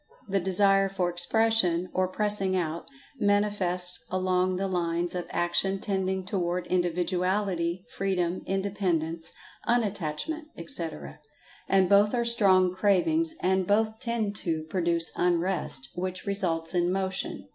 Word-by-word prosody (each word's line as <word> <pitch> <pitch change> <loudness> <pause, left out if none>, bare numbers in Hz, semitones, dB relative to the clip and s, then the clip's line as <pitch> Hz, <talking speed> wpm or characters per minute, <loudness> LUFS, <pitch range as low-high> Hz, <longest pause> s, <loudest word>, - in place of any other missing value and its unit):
The 195 0 +1
Desire 195 +1 +3
for 185 -2 -1
Expression 180 -1 +2
(or 185 0 +1
pressing 195 -1 0
out) 170 -2 -2 0.3
manifests 190 -4 +1
along 185 0 +1
the 195 +1 -1
lines 175 -1 -1
of 180 -1 -4
action 190 +3 0
tending 190 -2 -2
toward 180 -2 -2
Individuality, 180 0 0
Freedom, 185 -2 -1
Independence, 180 -5 -1 0.4
Unattachment, 225 - -1
etc. 165 - -4 0.5
And 190 -1 +4
both 205 +4 +4
are 235 -1 0
strong 190 -6 +4
cravings—and 200 - +1
both 220 +1 +1
tend 230 -4 -2
to 160 -5 -2
produce 170 -2 +2
Unrest, 175 -6 0
which 185 +1 -4
results 180 -5 -1
in 175 0 +1
Motion. 190 - -2
185 Hz, 115 wpm, -27 LUFS, 175-200 Hz, 0.5 s, And